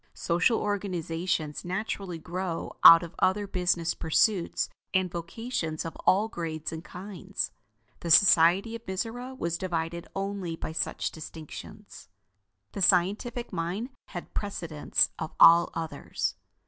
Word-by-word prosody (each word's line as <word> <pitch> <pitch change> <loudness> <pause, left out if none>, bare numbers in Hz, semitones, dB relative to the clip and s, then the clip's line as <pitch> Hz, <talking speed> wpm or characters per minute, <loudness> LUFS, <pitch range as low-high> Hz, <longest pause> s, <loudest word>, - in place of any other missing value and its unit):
Social 180 +7 +2
organizations 175 -5 -2
naturally 190 -1 -3
grow 175 +1 -4
out 165 +1 +11
of 170 0 -8
other 205 +2 +2
business 180 -3 0
pursuits 175 +3 +1 0.3
and 185 -2 +2
vocations 170 -2 -4
of 165 - -6
all 205 +4 +4
grades 160 -6 -5
and 160 0 -6
kinds. 190 +1 -5 0.5
The 170 - -5
society 185 +4 +6
of 230 - -8
Mizora 245 +7 -4
was 170 -4 -2
divided 170 -2 -3
only 195 -3 -3
by 160 - -6
such 160 - -2
distinctions. 160 -1 -10 0.6
The 200 - -6
scientific 205 +7 +2
mind 180 +8 -3 0.2
had 175 - -8
precedence 170 -7 0
of 160 -1 -5
all 170 +1 +8
others. 165 -1 -3
180 Hz, 120 wpm, -28 LUFS, 165-200 Hz, 0.6 s, out